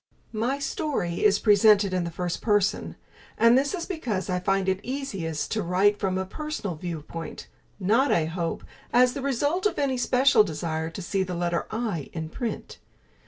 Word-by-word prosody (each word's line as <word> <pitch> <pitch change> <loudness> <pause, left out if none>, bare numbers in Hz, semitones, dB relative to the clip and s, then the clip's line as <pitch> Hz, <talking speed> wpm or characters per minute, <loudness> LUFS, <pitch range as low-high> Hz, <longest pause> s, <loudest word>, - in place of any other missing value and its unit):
My 235 +5 0
story 275 - -2
is 205 -1 +5
presented 205 -2 +5
in 180 -2 0
the - - -3
first 175 +1 -3
person, 205 -2 +1 0.4
and 230 +2 +6
this 280 +6 +2
is 340 -2 -4
because 230 - -3
I 180 - 0
find 195 +1 0
it 190 0 +1
easiest 195 - -4
to 215 - 0
write 195 +4 +2
from 190 -2 0
a 190 - -1
personal 210 - -5
viewpoint 165 0 -6 0.3
not, 225 +9 +3
I 160 - +3
hope, 165 +1 -3 0.3
as 250 0 +5
the 275 - -5
result 285 - +1
of - - -5
any 270 -2 0
special 255 -2 +4
desire 160 -2 -3
to 175 +3 -7
see 195 +3 -1
the 185 -1 -2
letter 175 0 -1
I 215 - -3
in 160 -1 -4
print. 235 +6 -5
200 Hz, 175 wpm, -26 LUFS, 175-250 Hz, 0.4 s, and